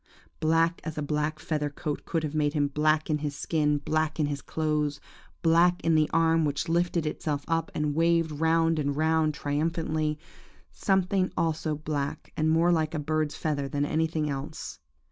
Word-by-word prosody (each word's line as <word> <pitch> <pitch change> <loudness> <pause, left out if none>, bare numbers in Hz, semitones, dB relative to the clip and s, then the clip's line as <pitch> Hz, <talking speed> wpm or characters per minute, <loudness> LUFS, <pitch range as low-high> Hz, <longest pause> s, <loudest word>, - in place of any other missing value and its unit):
Black 165 +2 +2
as 160 -1 -5
a 150 - -1
black 150 +1 -1
feather 150 -2 -2
coat 145 +1 -5
could 165 -1 -1
have 150 -1 -3
made 150 -1 +1
him 145 -2 +1
black 155 +2 +2
in 150 -1 0
his 145 -1 -3
skin, 150 -1 +1
black 155 +2 -1
in 150 - +3
his 145 -1 -3
clothes, 150 -2 -1 0.4
black 170 +2 +4
in 165 - +3
the 155 -1 +3
arm 165 0 +3
which 145 +3 -1
lifted 170 0 +1
itself 150 -1 -2
up 165 -1 0
and 150 -1 0
waved 165 0 +2
round 165 +1 +2
and 145 -1 -1
round, 160 -1 +2
triumphantly, 155 +1 -1 0.5
something 190 -1 +1
also 160 -2 0
black, 150 0 -4
and 155 0 +1
more 165 +2 +4
like 160 -1 +1
a - - 0
bird's 155 0 -1
feather 145 -3 -2
than 145 0 -1
anything 160 0 0
else. 145 +2 -5
155 Hz, 175 wpm, -27 LUFS, 150-165 Hz, 0.5 s, black